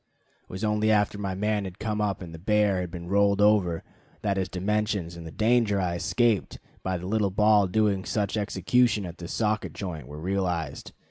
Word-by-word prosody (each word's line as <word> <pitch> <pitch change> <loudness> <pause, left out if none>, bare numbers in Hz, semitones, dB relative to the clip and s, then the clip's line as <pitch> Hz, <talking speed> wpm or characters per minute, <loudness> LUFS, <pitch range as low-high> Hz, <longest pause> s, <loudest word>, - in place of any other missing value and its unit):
It - - -37
was 95 +3 -6
only 105 0 +1
after 105 -1 +2
my 95 -2 -3
man 105 +1 0
had 95 -2 -7
come 105 -1 -2
up 100 -2 -1
and 85 -2 -9
the 80 - -9
bear 105 0 +2
had 90 - -4
been 85 0 -8
rolled 100 +1 +3
over 100 -6 +3 0.4
that 100 -2 +1
his 95 -1 -1
dimensions 100 -2 -1
and 85 -1 -8
the - - -8
danger 110 -1 +2
I 90 -2 0
escaped 110 +4 +1 0.2
by 95 -1 -2
the 90 - -7
little 105 +1 +1
ball 105 +1 +4
doing 100 0 +1
such 105 0 -1
execution 105 +2 +1
at 85 -1 -9
the 85 - -6
socket 110 +2 -1
joint 80 -9 -6
were 75 - -9
realized. 90 -4 -2
100 Hz, 200 wpm, -27 LUFS, 90-105 Hz, 0.4 s, ball